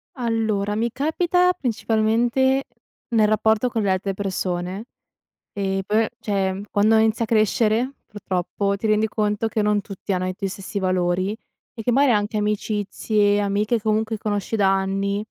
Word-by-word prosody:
Allora, 220 -5 -1
mi 230 +2 0
capita 350 +6 +2
principalmente 240 +1 +1 0.5
nel 215 -1 +5
rapporto 220 +2 +2
con 225 -2 -1
le 200 - 0
altre 190 +1 0
persone. 185 +1 -3 0.7
E 195 -1 -2
poi, 215 +2 +2
cioè 195 -2 -1
quando 215 +2 +3
inizi 220 +1 +3
a - - 0
crescere, 225 +3 +1
purtroppo, 200 0 -2
ti 220 - -2
rendi 215 +1 +2
conto 210 +1 -1
che 215 - -1
non 210 -1 +2
tutti 195 0 -5
hanno 185 0 -1
i 185 - -2
tuoi 195 0 -3
stessi 195 +2 -5
valori 185 +2 0 0.4
e 225 - -7
che 245 - +1
magari 275 +2 +4
anche 210 0 0
amicizie, 210 0 0
amiche 210 +3 0
comunque 220 +1 0
conosci 205 0 -2
da 195 -3 +3
anni 195 +1 -1
210 Hz, 155 wpm, -22 LUFS, 200-225 Hz, 0.7 s, nel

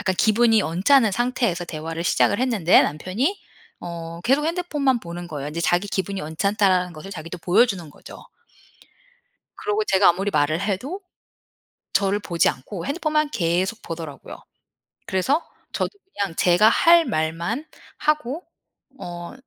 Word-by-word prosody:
약간 195 -3 0
기분이 225 0 +4
언짢은 205 - +3
상태에서 240 -6 0
대화를 165 0 -5
시작을 200 - +2
했는데 225 -10 +4
남편이 200 - -1 0.4
어 170 -1 -7
계속 275 +4 +2
핸드폰만 300 -7 0
보는 175 -1 -7
거예요. 145 -3 -5
인제 165 +3 -4
자기 175 +4 +1
기분이 195 0 -2
언짢다라는 185 +3 +1
것을 160 +5 -10
자기도 165 0 -7
보여주는 180 0 +2
거죠. - - -13 1.4
그러고 420 0 -1
제가 190 - +4
아무리 195 +4 0
말을 155 +4 +1
해도 245 - -3 0.9
저를 200 +1 +2
보지 170 -4 +1
않고 170 - -5
핸드폰만 305 0 0
계속 185 +2 -1
보더라고요. 160 -4 -8 0.7
그래서 265 - +1 0.3
저도 - - -1 0.2
그냥 195 -5 -2
제가 180 +5 +5
할 335 +7 +5
말만 170 - -2 0.3
하고 300 +1 -1 0.5
어 175 -1 -7
195 Hz, 315 characters per minute, -23 LUFS, 170-250 Hz, 1.4 s, 제가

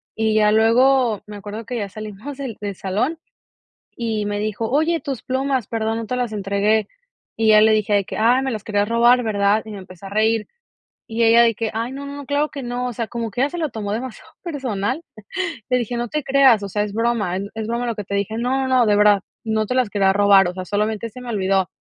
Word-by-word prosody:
Y 220 -1 +1
ya 210 -1 +4
luego 230 +1 +3
me 210 -1 -8
acuerdo 210 +2 -7
que 245 - -4
ya 200 -2 -3
salimos 215 +7 -8
del 260 -6 -5
del 200 -1 -4
salón 220 - -1 0.8
y 220 -3 -2
me 205 0 -2
dijo: 215 +1 -2
oye, 315 +4 +2
tus 275 -5 -5
plumas, 260 -2 -1
perdón, 225 0 -1
no 225 - -5
te 250 - -2
las 245 -3 -2
entregué. 205 +1 +1 0.5
Y 220 -1 +3
ya 215 0 +7
le 220 +1 +5
dije 215 -1 +1
de 200 -1 +2
que - - -7
ay, 245 +4 +4
me 265 - -1
las 215 -4 -5
quería 205 -1 +1
robar, 235 +3 +4
¿verdad? 205 -1 +1
Y 220 - -10
me 205 - -7
empece 185 0 -13
a - - -6
reír, 220 +1 +1 0.6
y 230 +1 0
ella 230 +1 +6
de 230 -1 +3
que 225 -2 -2
ay, 230 +2 -2
no, 280 +1 -7
no 285 0 -7
claro 290 +2 +1
que 275 - -7
no. 245 +1 -3
O - - -4
sea, 230 0 -4
como 230 -2 -4
que 245 - -3
ya 285 - +1
se 350 - -5
lo 310 -4 -1
tomó 205 -2 -4
demasiado 245 +1 -6
personal, 270 - -2 0.7
le 250 - +2
dije: 240 0 -3
"no 240 -1 -2
te 300 +1 -3
creas, 265 -6 +5
o 195 - -6
sea, 210 +1 0
es 205 - -6
broma, 225 -5 0
es 195 - -3
es 220 0 -4
broma 235 +1 -1
lo 235 - -1
que 210 - -5
te 200 - -5
dije", 205 +3 -2
"no, 260 +2 0
no, 255 -3 +4
de 205 -1 +3
verdad, 205 -1 +5 0.2
no 220 -1 0
te 250 - -2
las 250 -5 +1
quería 195 -2 +3
robar, 200 -2 +5
o 180 - -5
sea, 185 -1 -5
solamente 215 +3 -2
se 250 - -11
me 250 - -9
olvidó". 190 -3 +1
220 Hz, 245 wpm, -21 LUFS, 205-250 Hz, 0.8 s, ya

